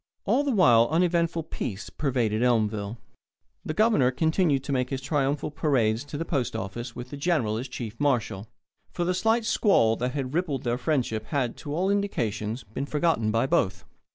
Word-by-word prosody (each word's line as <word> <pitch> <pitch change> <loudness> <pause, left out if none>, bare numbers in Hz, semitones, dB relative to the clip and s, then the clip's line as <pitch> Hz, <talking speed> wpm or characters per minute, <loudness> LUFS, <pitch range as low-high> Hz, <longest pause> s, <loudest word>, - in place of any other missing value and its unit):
All 285 - +2
the 290 - -1
while 120 - +5
uneventful 170 0 +1
peace 100 -8 -5
pervaded 120 -7 0
Elmville. 110 -3 +1 0.7
The 155 - -4
Governor 215 - +4
continued 160 0 +1
to - - -4
make 125 -2 0
his 135 - -2
triumphal 140 +1 -1
parades 130 -7 +1
to 145 0 -6
the 165 - -3
post 135 -8 -1
office 115 +5 -5
with 125 +1 -8
the 145 - -6
General 140 -9 0
as 125 +4 -4
chief 115 -3 -7
marshal, 120 -8 0 0.4
for 175 - -3
the 180 - +1
slight 225 +5 +1
squall 155 - +3
that 125 +1 -2
had 135 -2 -3
rippled 155 -6 -1
their 120 0 -1
friendship 120 -6 -1
had, 130 -4 -1
to 145 -2 -5
all 185 +4 +1
indications, 115 - -2
been 110 +7 -5
forgotten 150 -8 +1
by 115 +3 +2
both. 95 -8 0
135 Hz, 180 wpm, -26 LUFS, 115-160 Hz, 0.7 s, while